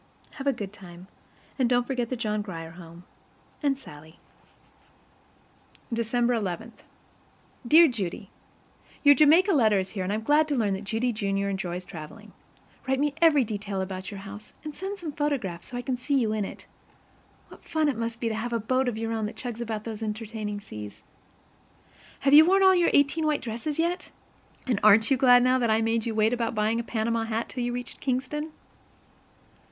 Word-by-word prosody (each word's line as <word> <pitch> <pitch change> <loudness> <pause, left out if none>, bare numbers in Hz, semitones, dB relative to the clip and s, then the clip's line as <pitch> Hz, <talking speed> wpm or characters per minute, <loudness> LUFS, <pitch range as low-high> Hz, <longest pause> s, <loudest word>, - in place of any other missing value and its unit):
Have 270 - -4
a - - +5
good 210 -6 -6
time, 180 -3 -12 0.5
and 250 -2 +3
don't 245 -1 +2
forget 245 -3 -2
the 255 - -2
John 215 -3 -2
Grier 165 -5 -7
Home 170 0 -13 0.6
and 280 -3 +1
SALLIE. 155 - -14 1.8
December 235 +1 +1
11. 210 0 -3 1.0
Dear 325 +5 +8
Judy: 200 - -4 0.7
Your 285 -1 +8
Jamaica 320 +8 +5
letter 220 -8 +4
is 190 0 -1
here, 195 -4 -3
and 185 - -2
I'm 215 +1 -2
glad 300 +5 +3
to 290 - -1
learn 215 -5 +1
that 195 +2 -5
Judy, 230 +4 -1
Junior, 200 -2 -1
enjoys 180 -2 -4
traveling. 180 +7 -10 0.5
Write 265 0 +1
me 290 0 +1
every 305 -5 +6
detail 205 -3 -4
about 185 0 -4
your 200 -2 -8
house, 200 +2 -10
and 305 -1 -6
send 385 +5 -5
some 335 -5 -6
photographs, 270 - -2
so 245 - -6
I 245 - -4
can 255 -1 -2
see 275 +3 0
you 225 -4 +1
in 215 -2 -1
it. - - -9 0.8
What - - -15
fun 315 -1 0
it 285 - 0
must 230 0 -4
be 235 - -1
to 225 - -1
have 230 +2 -3
a 230 - +1
boat 255 +4 0
of 235 -3 -2
your 225 0 -3
own 220 -2 -1
that 215 - -8
chugs 240 -2 -6
about 220 -2 -4
those 225 -1 -6
entertaining 215 -1 -4
seas! 105 - -9 1.2
Have 275 0 +3
you 305 +2 +10
worn 385 +4 +4
all 380 - +7
of 370 - +3
your 345 - +3
eighteen 290 +3 +3
white 300 -1 0
dresses 235 +6 -4
yet? 345 +2 -1 0.6
And 245 -6 0
aren't 215 +3 +6
you 270 - +4
glad 245 -1 +6
now 255 +1 +3
that 235 -2 +1
I 220 0 +3
made 225 0 0
you 225 - -2
wait 220 +2 +3
about 235 -2 -1
buying 215 +2 +1
a - - -2
Panama 230 0 -1
hat 225 +1 -3
till 250 - -4
you 245 - -1
reached 245 0 -6
Kingston? 285 +4 -2
230 Hz, 195 wpm, -26 LUFS, 210-270 Hz, 1.8 s, you